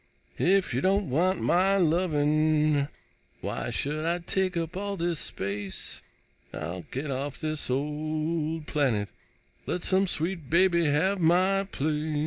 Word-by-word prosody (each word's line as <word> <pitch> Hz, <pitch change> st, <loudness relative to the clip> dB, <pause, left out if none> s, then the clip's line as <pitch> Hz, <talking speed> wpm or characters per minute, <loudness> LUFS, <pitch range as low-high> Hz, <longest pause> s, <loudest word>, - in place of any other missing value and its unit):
If 190 Hz, +1 st, +3 dB
you -, -, 0 dB
don't 190 Hz, -4 st, +1 dB
want 180 Hz, +7 st, +2 dB
my 190 Hz, +3 st, +3 dB
lovin', 155 Hz, -3 st, +2 dB, 0.5 s
Why -, -, -3 dB
should 150 Hz, +2 st, -1 dB
I 170 Hz, +2 st, +1 dB
take 185 Hz, +1 st, 0 dB
up 165 Hz, 0 st, -3 dB
all 200 Hz, +1 st, -3 dB
this 170 Hz, -2 st, 0 dB
space? 100 Hz, 0 st, -3 dB, 0.5 s
I'll 85 Hz, +2 st, -5 dB
get 140 Hz, +2 st, -4 dB
off 135 Hz, +1 st, -3 dB
this 155 Hz, -3 st, -3 dB
old 155 Hz, +3 st, -2 dB
planet, 120 Hz, -11 st, 0 dB, 0.6 s
Let 180 Hz, -, -2 dB
some 190 Hz, +1 st, +2 dB
sweet 165 Hz, -3 st, -2 dB
baby 170 Hz, 0 st, +4 dB
have 165 Hz, +7 st, +2 dB
my 185 Hz, +4 st, +3 dB
place. 155 Hz, -2 st, -2 dB
155 Hz, 130 wpm, -27 LUFS, 145-185 Hz, 0.6 s, baby